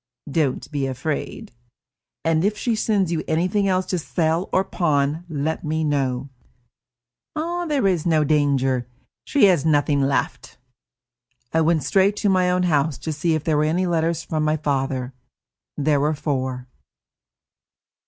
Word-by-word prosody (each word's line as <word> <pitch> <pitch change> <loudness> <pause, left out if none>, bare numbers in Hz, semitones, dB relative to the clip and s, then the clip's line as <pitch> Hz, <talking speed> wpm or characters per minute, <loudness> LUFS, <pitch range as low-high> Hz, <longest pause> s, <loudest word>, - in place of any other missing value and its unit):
"Don't 145 -2 -1
be 140 -2 -1
afraid." 135 +3 -4 0.7
"And 165 0 +2
if 210 +2 +1
she 235 - 0
sends 205 -5 +1
you 165 - -1
anything 180 +5 +1
else 185 -1 +1
to 180 - -2
sell 165 +2 -1
or 185 - +3
pawn, 155 -3 0
let 160 +3 -2
me 160 0 -1
know." 135 -3 -1 1.4
"There 285 -7 0
is 180 -5 +2
no 155 -2 +3
danger. 135 -4 +1 0.4
She 285 -7 +4
has 180 -7 +4
nothing 145 -2 +2
left." 135 0 -2 1.0
I 160 - +3
went 160 -2 +2
straight 195 +8 +3
to 205 0 0
my 185 -1 +3
own 180 0 +1
house 150 -4 +1
to 160 - -4
see 160 +2 0
if 155 - -3
there 155 -2 +1
were 150 - +2
any 170 +4 +1
letters 165 -1 0
from 155 -1 -2
my 155 0 +1
father. 135 -3 -2 0.6
There 145 0 +2
were 150 +2 +1
four. 130 -4 -3
155 Hz, 150 wpm, -22 LUFS, 140-175 Hz, 1.4 s, She